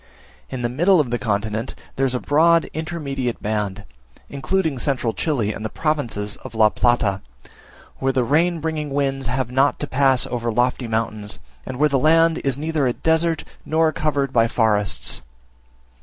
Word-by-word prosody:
In 130 Hz, -2 st, -5 dB
the -, -, +2 dB
middle 175 Hz, +9 st, +3 dB
of 135 Hz, -6 st, 0 dB
the 120 Hz, -, 0 dB
continent 110 Hz, +2 st, -2 dB, 0.2 s
there 135 Hz, 0 st, +1 dB
is 130 Hz, -, -2 dB
a -, -, 0 dB
broad 165 Hz, +4 st, +3 dB
intermediate 145 Hz, -6 st, -3 dB
band, 105 Hz, -2 st, -2 dB, 0.5 s
including 155 Hz, 0 st, -1 dB
central 125 Hz, -4 st, 0 dB
Chile 120 Hz, -10 st, -1 dB
and 110 Hz, -, -7 dB
the 110 Hz, -, -2 dB
provinces 120 Hz, -11 st, -2 dB
of 115 Hz, -, -11 dB
La 110 Hz, -1 st, +5 dB
Plata, 105 Hz, -5 st, +1 dB, 0.8 s
where 135 Hz, 0 st, +1 dB
the 130 Hz, -1 st, +1 dB
rain 165 Hz, +7 st, +2 dB
bringing 155 Hz, -2 st, -2 dB
winds 135 Hz, -2 st, -1 dB
have 125 Hz, 0 st, -1 dB
not 135 Hz, +3 st, +2 dB
to -, -, -2 dB
pass 135 Hz, -2 st, +2 dB
over 120 Hz, -1 st, -2 dB
lofty 125 Hz, +1 st, 0 dB
mountains, 110 Hz, -2 st, -3 dB, 0.3 s
and 130 Hz, -, -5 dB
where 150 Hz, +3 st, +4 dB
the 140 Hz, -2 st, +1 dB
land 165 Hz, +2 st, +4 dB
is 135 Hz, -2 st, 0 dB
neither 155 Hz, -2 st, 0 dB
a 120 Hz, -, +1 dB
desert 160 Hz, +1 st, +1 dB, 0.2 s
nor 160 Hz, 0 st, +2 dB
covered 140 Hz, -3 st, -1 dB
by 115 Hz, -1 st, +4 dB
forests. 105 Hz, -4 st, +1 dB
135 Hz, 170 wpm, -21 LUFS, 115-155 Hz, 0.8 s, La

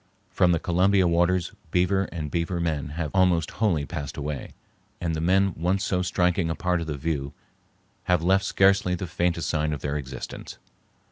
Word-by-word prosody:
From 90 Hz, -, +3 dB
the 85 Hz, -, +3 dB
Columbia 95 Hz, +2 st, +3 dB
waters 85 Hz, +1 st, +2 dB, 0.2 s
beaver 90 Hz, +3 st, +2 dB
and 75 Hz, -5 st, -6 dB
beaver 85 Hz, +1 st, -1 dB
men 80 Hz, -5 st, -1 dB
have 80 Hz, -3 st, -2 dB
almost 90 Hz, -4 st, +2 dB
wholly 85 Hz, -10 st, +2 dB
passed 75 Hz, -3 st, -6 dB
away, 75 Hz, -1 st, -5 dB, 0.4 s
and 85 Hz, -2 st, -1 dB
the 80 Hz, -, -3 dB
men 95 Hz, +2 st, +3 dB
once 90 Hz, +4 st, 0 dB
so 90 Hz, -1 st, 0 dB
striking 90 Hz, -1 st, +1 dB
a 80 Hz, -, -1 dB
part 90 Hz, -1 st, 0 dB
of 80 Hz, -, -5 dB
the 75 Hz, -2 st, -3 dB
view 70 Hz, -2 st, -3 dB, 0.7 s
have 90 Hz, -2 st, +2 dB
left 95 Hz, +2 st, +3 dB
scarcely 95 Hz, -2 st, +3 dB
the 90 Hz, -, -4 dB
faintest 85 Hz, 0 st, -1 dB
sign 75 Hz, -1 st, 0 dB
of 70 Hz, -, -5 dB
their 75 Hz, +1 st, -2 dB
existence. 65 Hz, -3 st, -7 dB
85 Hz, 180 wpm, -25 LUFS, 80-90 Hz, 0.7 s, From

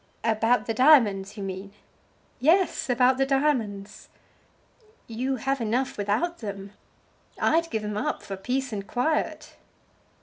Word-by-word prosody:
"About 225 Hz, +2 st, +2 dB
the 225 Hz, -, -2 dB
diamonds, 220 Hz, -7 st, +4 dB
you 200 Hz, -, -5 dB
mean?" 195 Hz, +1 st, -6 dB, 0.7 s
"Yes; 330 Hz, +3 st, +2 dB
about 255 Hz, +1 st, +3 dB
the 270 Hz, -, +3 dB
diamonds." 230 Hz, -8 st, -1 dB, 1.0 s
"You 255 Hz, +4 st, -2 dB
have 270 Hz, +1 st, -2 dB
enough 240 Hz, +4 st, -1 dB
without 215 Hz, -, -1 dB
them. 200 Hz, -3 st, -7 dB, 0.7 s
I'd 330 Hz, +1 st, +2 dB
give 220 Hz, -6 st, -3 dB
'em 210 Hz, 0 st, -4 dB
up -, -, -2 dB
for 195 Hz, -, -6 dB
peace 250 Hz, +6 st, -3 dB
and 200 Hz, -1 st, -5 dB
quiet." 300 Hz, +6 st, -2 dB
235 Hz, 130 wpm, -26 LUFS, 205-270 Hz, 1.0 s, diamonds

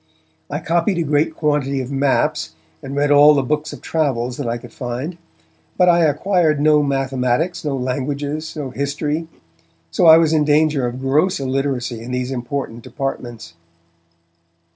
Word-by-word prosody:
I -, -, -2 dB
copied 170 Hz, +3 st, 0 dB
a 170 Hz, -, +1 dB
great 150 Hz, +1 st, 0 dB
quantity 145 Hz, -3 st, 0 dB
of 130 Hz, +1 st, -5 dB
maps, 140 Hz, -, 0 dB, 0.3 s
and 135 Hz, -, -7 dB
read 145 Hz, +1 st, +1 dB
all 145 Hz, +1 st, +7 dB
the 140 Hz, -, +1 dB
books 150 Hz, +3 st, -2 dB
of -, -, -11 dB
travels 125 Hz, -6 st, -1 dB
that 140 Hz, -, -4 dB
I 115 Hz, +1 st, -1 dB
could 120 Hz, -1 st, -13 dB
find. 130 Hz, +7 st, -5 dB, 0.6 s
But 180 Hz, -1 st, +5 dB
I 170 Hz, 0 st, +5 dB
acquired 155 Hz, 0 st, +1 dB
no 150 Hz, 0 st, +4 dB
mathematics, 135 Hz, +4 st, -1 dB
no 145 Hz, -3 st, -2 dB
languages, 140 Hz, +5 st, -3 dB
no 145 Hz, -4 st, -5 dB
history, 145 Hz, +4 st, -2 dB, 0.6 s
so 85 Hz, -, +1 dB
that -, -, +8 dB
I -, -, +8 dB
was 165 Hz, -1 st, +3 dB
in 155 Hz, -1 st, +3 dB
danger 150 Hz, -3 st, +2 dB
of 125 Hz, +2 st, -6 dB
gross 150 Hz, +7 st, +1 dB
illiteracy 130 Hz, -3 st, -2 dB
in 120 Hz, -, -8 dB
these 125 Hz, +1 st, -2 dB
important 125 Hz, -2 st, -4 dB
departments. 120 Hz, -6 st, -6 dB
140 Hz, 165 wpm, -19 LUFS, 130-155 Hz, 0.6 s, that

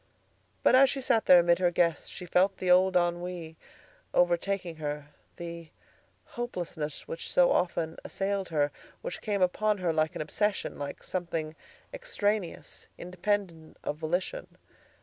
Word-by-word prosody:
But -, -, +5 dB
as 265 Hz, +1 st, +7 dB
she 275 Hz, -, -2 dB
sat 250 Hz, -4 st, +1 dB
there 180 Hz, -, +9 dB
amid 170 Hz, 0 st, +3 dB
her 180 Hz, -1 st, +4 dB
guests, 170 Hz, -3 st, +1 dB
she 180 Hz, -, -8 dB
felt 190 Hz, +3 st, +2 dB
the 185 Hz, -1 st, +1 dB
old 185 Hz, +1 st, +5 dB
ennui 175 Hz, -1 st, -2 dB, 0.6 s
overtaking 175 Hz, 0 st, +1 dB
her; 150 Hz, -1 st, -4 dB, 0.3 s
the 170 Hz, -1 st, -7 dB, 0.6 s
hopelessness 175 Hz, -10 st, -5 dB
which 485 Hz, +1 st, -5 dB
so -, -, +5 dB
often 170 Hz, -, 0 dB
assailed 195 Hz, -1 st, -2 dB
her, 145 Hz, -3 st, +1 dB, 0.3 s
which -, -, -5 dB
came 205 Hz, -3 st, 0 dB
upon 210 Hz, +3 st, +1 dB
her 175 Hz, -3 st, 0 dB
like 155 Hz, 0 st, +1 dB
an -, -, -3 dB
obsession, 205 Hz, +4 st, -1 dB
like 145 Hz, 0 st, -6 dB
something 165 Hz, -4 st, -3 dB, 0.4 s
extraneous, 215 Hz, -, -2 dB
independent 180 Hz, -2 st, -3 dB
of 150 Hz, -, -3 dB
volition. 175 Hz, -, -2 dB
180 Hz, 140 wpm, -29 LUFS, 165-200 Hz, 0.6 s, there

